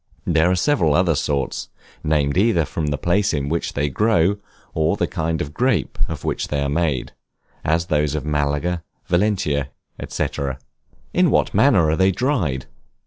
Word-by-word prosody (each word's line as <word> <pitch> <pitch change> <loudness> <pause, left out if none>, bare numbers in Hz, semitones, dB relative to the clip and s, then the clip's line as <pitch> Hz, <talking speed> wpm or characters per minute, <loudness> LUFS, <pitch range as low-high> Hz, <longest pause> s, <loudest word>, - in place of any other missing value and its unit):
There 85 +1 +3
are 90 - +2
several 90 - +2
other 90 -1 +3
sorts, 70 -3 -2 0.3
named 75 -2 +1
either 95 -4 +3
from 75 +2 -3
the 75 0 -1
place 100 0 +1
in 70 -1 -2
which 85 +2 -2
they 75 0 0
grow, 100 - +2 0.4
or 80 -1 +1
the - - +1
kind 80 0 -2
of 75 - -9
grape 120 - 0
of - - -6
which - - -2
they 75 - -1
are 70 - -1
made, 75 -4 -1 0.5
as 80 +2 +1
those 75 -3 0
of 75 -2 -3
Malaga, 75 +3 0 0.2
Valencia, 85 -7 +1 0.4
&c. - - -1 0.9
In - - +4
what - - +2
manner 80 - +4
are 75 - +2
they 95 +3 +3
dried? 90 - 0
80 Hz, 165 wpm, -21 LUFS, 75-90 Hz, 0.9 s, In